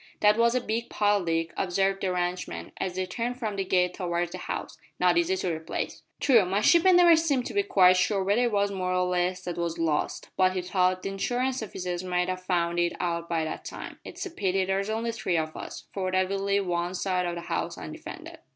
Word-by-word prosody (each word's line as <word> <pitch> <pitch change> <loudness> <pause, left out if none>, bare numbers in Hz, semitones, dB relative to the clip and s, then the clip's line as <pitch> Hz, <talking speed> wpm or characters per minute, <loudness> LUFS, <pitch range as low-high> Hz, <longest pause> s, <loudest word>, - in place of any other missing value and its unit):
'" - - -31
"That 210 0 +6
was 235 +2 +3
a 255 - +2
big 230 +1 -3
pile, 205 -2 +2
Dick," 165 0 -1
observed 195 +1 0
the 190 - 0
ranchman, 175 - -3
as 180 -1 -3
they 185 0 -1
turned 235 +7 -3
from 220 -5 -3
the 195 - -1
gate 180 -1 +2
towards 175 -2 -2
the - - -6
house, - - -5 0.2
"not - - +4
easy 345 +2 +2
to 180 - -1
replace." 160 0 -4 0.2
"True 240 -7 +5
my 190 +2 0
shipmate 340 - +5
never 350 -1 +7
seemed 290 -6 +1
to - - -5
be 405 - +3
quite 185 - +5
sure 195 +1 +1
whether 205 +5 +2
it 240 - 0
was 200 -1 +1
more 185 -1 -1
or 180 0 +2
less 180 +1 0
that 175 -1 -4
was 170 -1 -2
lost, 160 -3 -1
but 185 -1 +3
he 185 -1 -2
thought 185 0 +1
the - - -2
Insurance 250 +6 -1
offices 180 -4 -4
must 180 0 0
have 185 0 -3
found 175 -2 0
it 175 0 +1
out 170 -1 -2
by 165 -2 0
that 155 - -5
time. - - -8
It's - - -7
a - - -6
pity 190 - 0
there's 195 +2 -1
only 225 +1 -1
three 185 -6 -1
of 155 -1 -2
us, - - -7
for 185 -2 -2
that 185 0 +1
will 195 0 -1
leave 200 0 +1
one 175 0 -1
side 180 -1 0
o' 175 - -3
the 170 - -5
house - - -3
undefended." - - -9
185 Hz, 235 wpm, -27 LUFS, 180-210 Hz, 0.2 s, never